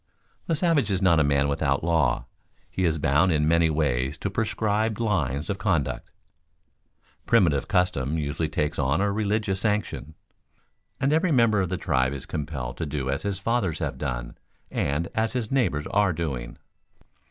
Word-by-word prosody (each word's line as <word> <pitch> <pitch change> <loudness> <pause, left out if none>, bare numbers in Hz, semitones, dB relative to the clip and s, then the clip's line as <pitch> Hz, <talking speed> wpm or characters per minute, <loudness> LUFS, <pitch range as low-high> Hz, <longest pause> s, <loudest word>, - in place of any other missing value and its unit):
_ - - -38
The 165 - +1
savage 155 - +2
is 95 -2 +1
not 90 -4 +4
a - - +4
man 70 0 +2
without 70 +1 0
law; 80 -7 +1 0.5
he 95 - 0
is 80 -2 +1
bound 75 +5 +3
in 75 -1 +2
many 85 0 +4
ways 70 -2 0
to 100 - -3
prescribed 110 0 0
lines 75 - 0
of 100 -2 -3
conduct. 95 -9 -1 1.2
Primitive 85 - +3
custom 80 -5 +1
usually 75 +1 -2
takes 75 -1 -2
on 70 +3 +1
a 100 +1 +1
religious 105 -1 0
sanction, 105 -7 -2 0.8
and 140 +3 +2
every 160 +2 +2
member 115 -6 +4
of 90 - -1
the 95 - -2
tribe 65 -6 +1
is 70 - -7
compelled 70 -5 -5
to 80 - -3
do 70 -2 -2
as 70 +3 -2
his 100 +1 -2
fathers 100 -5 0
have - - -4
done - - -4 0.4
and 75 +4 -1
as 110 0 0
his 120 -4 -3
neighbors 115 - +1
are 100 -2 +2
doing. 70 -8 -4
85 Hz, 170 wpm, -25 LUFS, 70-105 Hz, 1.2 s, not